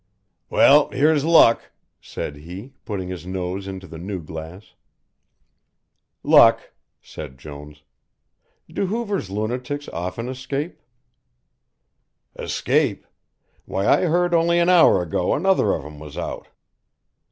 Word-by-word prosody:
"Well, 145 +1 +5
here's 150 +1 +2
luck," 160 -8 +4 0.3
said 75 - -6
he, 90 - -10
putting 95 -4 -4
his 90 -1 -7
nose 95 +1 -4
into 95 -1 -7
the 80 -3 -10
new 95 +2 -5
glass. 80 +4 -10 1.5
"Luck!" - - +5 0.3
said 70 -4 -9
Jones. 75 +1 -11 0.8
"Do 195 - -3
Hoover's 205 - -3
lunatics 125 +8 -4
often 90 +8 -5
escape?" 135 +5 -5 1.5
"Escape - - -1 0.6
why 95 +1 -2
I 150 - +4
heard 175 +1 +1
only 170 +1 +3
an 175 +1 +3
hour 175 - +5
ago 90 +1 -1
another 185 - +2
of - - -2
them 75 0 -11
was 75 -1 -10
out. - - -5
100 Hz, 115 wpm, -22 LUFS, -, 1.5 s, Well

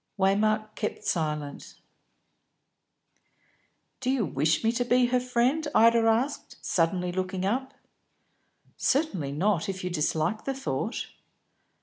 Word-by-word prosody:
Waymark 215 +2 +2
kept 215 - -4
silence. 150 -3 -3 2.2
"Do 255 - -2
you 260 -5 +1
wish 155 +3 +1
me 225 - +3
to 240 +1 0
be 245 +1 +3
her 250 +1 +2
friend?" 250 +5 +1
Ida 230 +1 +6
asked, 240 +6 0
suddenly 180 +1 +1
looking 185 +1 -2
up. 260 +6 -1 1.0
"Certainly 190 - 0
not 180 +3 +1
if 190 -1 -4
you 180 - -2
dislike 165 +5 -1
the 270 - -2
thought." 270 - -3
210 Hz, 115 wpm, -27 LUFS, 175-245 Hz, 2.2 s, Ida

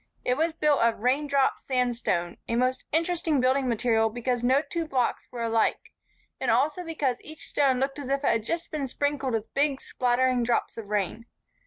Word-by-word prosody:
It 250 - +2
was 320 +3 0
built 300 -3 +2
of 230 -2 +2
"raindrop" 275 +2 +2
sandstone, 240 -9 -1
a 230 - -1
most 255 +2 0
interesting 325 -2 +1
building 260 +1 +2
material 225 -1 +2
because 240 +1 -2
no 260 +4 +3
two 335 -2 -3
blocks 255 -5 -1
were 240 -2 -5
alike 225 -1 0 0.5
and 260 - -1
also 290 +9 +2
because 295 -7 -1
each 310 +1 -10
stone 270 -3 +2
looked 270 +2 -1
as 275 -2 -6
if 275 +1 0
it - - +1
had 225 -1 0
just 335 +8 -3
been 290 -3 -2
sprinkled 280 -1 -1
with 225 -1 -3
big, 280 -1 +1
spattering 250 0 +1
drops 235 0 0
of 225 -3 -7
rain. 210 +2 -2
260 Hz, 185 wpm, -27 LUFS, 235-290 Hz, 0.5 s, no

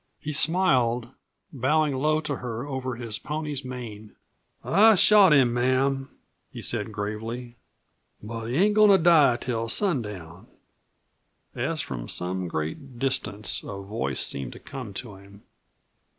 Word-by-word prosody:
He 150 - -5
smiled, 130 -8 +2 0.4
bowing 145 +2 +1
low 155 +3 +1
to 150 -4 -3
her 120 0 -5
over 130 -3 -4
his 115 -3 -5
pony's 150 -2 -4
mane. 115 -5 -8 0.5
"I 220 +2 +5
shot 200 -1 +6
him, 130 -5 +5
ma'am," 135 +2 +1 0.4
he - - -9
said 110 -1 -3
gravely, 110 +3 -5 0.6
"but 115 +1 -7
he 120 - -3
ain't 205 +4 +4
goin' 215 0 +6
to 195 - +7
die 155 -8 +5
till 115 -3 -3
sundown." 105 - -1 1.1
As - - -1
from - - -6
some 90 +1 -2
great 120 - -5
distance 130 -5 -1
a 100 - -7
voice 95 - -2
seemed 70 -3 -5
to - - -12
come 130 -6 -8
to 105 -4 -8
him. 100 +1 -17
125 Hz, 135 wpm, -25 LUFS, 105-145 Hz, 1.1 s, to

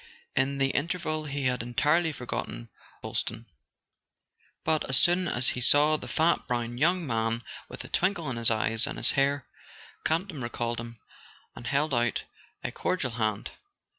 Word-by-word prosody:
In 140 +1 +1
the 135 0 +2
interval 155 -1 -2
he 140 -2 -3
had 125 -2 +1
entirely 150 +8 +2
forgotten 115 - -5 0.3
Boylston; 115 - -3 1.2
but 155 -1 +1
as 130 - +6
soon 175 +3 +4
as 125 -4 +3
he 125 - -3
saw 145 +5 +5
the - - -6
fat 165 +2 +1
brown 120 -1 -2
young 175 +3 +2
man 115 -2 -1 0.3
with - - -8
a - - -9
twinkle 180 -3 0
in - - -3
his 115 -1 +3
eyes 110 0 +3
and - - -5
his - - +5
hair, 140 0 +1 0.6
Campton 165 -2 -1
recalled 120 0 -2
him, 115 0 -8 0.6
and 120 - -8
held 140 +2 +1
out 120 -1 +1 0.4
a - - -2
cordial 155 -9 -1
hand. 110 -2 -2
135 Hz, 160 wpm, -28 LUFS, 120-155 Hz, 1.2 s, as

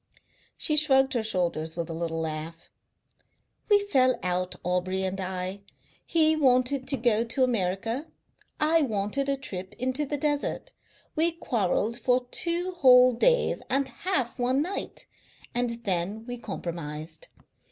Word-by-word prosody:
She 305 - +2
shrugged 270 -3 +4
her 240 - +1
shoulders 175 -6 -2
with 170 -1 -3
a 165 - -5
little 165 0 -3
laugh. 160 +1 -6 1.0
"We 415 - +7
fell 265 -11 +2
out, 180 0 -1
Aubrey 180 +1 0
and 190 +1 -2
I. 185 +1 -4 0.4
He 315 -1 +3
wanted 260 -2 +2
to 275 0 0
go 230 -2 +2
to 235 +3 0
America. 230 - -1 0.5
I 320 +2 +4
wanted 230 +2 -1
a 275 - +1
trip 190 -6 -6
into 260 +4 -1
the 290 - -2
desert. 290 - -1 0.4
We 330 +2 +3
quarrelled 230 - -1
for 250 0 +1
two 345 +2 -1
whole 255 -7 +6
days - - +2
and 270 0 +1
half 260 -2 -2
one 255 +3 +2
night, 380 +4 -5 0.5
and 245 0 0
then 195 +2 -1
we 245 0 -6
compromised. 160 -6 -6
245 Hz, 140 wpm, -27 LUFS, 185-275 Hz, 1.0 s, We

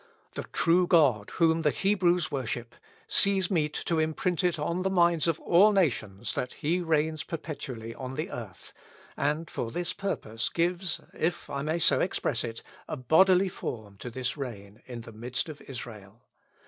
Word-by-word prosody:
The - - -5
true 175 +1 +2
God 135 -13 +4
whom 165 -1 +3
the 150 - +3
Hebrews 180 -2 +2
worship, 120 -3 -3 0.3
sees 195 -1 +4
meet 150 -4 +1
to 165 -2 +1
imprint 160 +3 0
it 175 -2 +2
on 170 +4 -1
the 190 - +1
minds 170 -4 +3
of 165 -1 +1
all 195 +5 +6
nations 120 - 0
that 125 - -3
he 170 +5 0
reigns 160 -1 0
perpetually 135 -9 -6
on 130 +1 -6
the 160 +7 -3
earth, 110 -7 -8 0.4
and 150 +3 0
for 115 - -4
this 175 +7 -3
purpose 115 - -3
gives, 175 0 0
if 170 +2 -2
I 140 - -2
may 155 +3 0
so 170 - +4
express 125 -9 0
it, 115 -2 -6 0.2
a - - -4
bodily 180 +8 +5
form 110 - -6
to 125 - -6
this 125 +1 -2
reign 105 -6 -7
in 120 -2 -6
the 115 - -11
midst 125 +7 -3
of 150 - -9
Israel. 115 -5 -9
155 Hz, 170 wpm, -28 LUFS, 120-175 Hz, 0.4 s, all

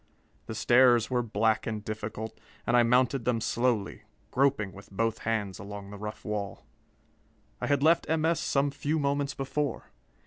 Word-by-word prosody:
The 110 - -5
stairs 120 0 +5
were 125 -1 +2
black 110 -1 +1
and 110 -2 -4
difficult, 110 +1 -5 0.3
and 120 - +2
I 120 - +7
mounted 125 +2 +3
them 120 -1 +1
slowly, 115 -3 0 0.3
groping 130 -7 +1
with 100 +1 -13
both 115 +3 -1
hands 105 -4 -2
along 100 0 -8
the 105 - -8
rough 105 +1 -7
wall. 105 -2 -4 1.0
I - - -1
had 140 -1 +2
left 165 +2 +4
M. 160 0 +1
S. 165 0 +2
some 140 -1 +1
few 145 +2 -1
moments 140 -1 0
before. 135 -1 -3
120 Hz, 165 wpm, -29 LUFS, 105-140 Hz, 1.0 s, I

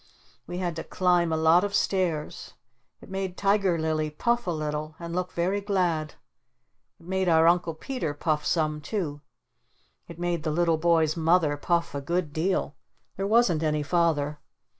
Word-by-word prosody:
We 175 - -5
had 175 -3 -2
to 160 - -4
climb 175 -2 +1
a 160 - +1
lot 160 +3 +5
of 205 0 -2
stairs. 175 -8 -1 0.5
It - - -14
made 190 -1 -3
Tiger 195 -3 +2
Lily 155 -1 -1
puff 235 +10 -1
a - - +1
little 155 -1 -3
and 170 0 -7
look 180 0 -2
very 185 +4 -1
glad. 175 -7 -1 0.8
It - - -18
made 190 0 0
our 160 -1 +5
Uncle 170 -1 +2
Peter 165 - -4
puff 150 0 -1
some 155 -2 0
too. 150 -6 -3 0.9
It 170 - -10
made 175 -1 -1
the 155 - -2
little 165 0 +1
boy's 160 -2 +3
Mother 165 -2 +2
puff 170 +2 -1
a 140 - -3
good 170 +1 -2
deal. 160 -2 -1 0.4
There 195 - -2
wasn't 210 -7 +3
any 150 -2 0
Father. 150 -2 +1
170 Hz, 165 wpm, -26 LUFS, 155-180 Hz, 0.9 s, lot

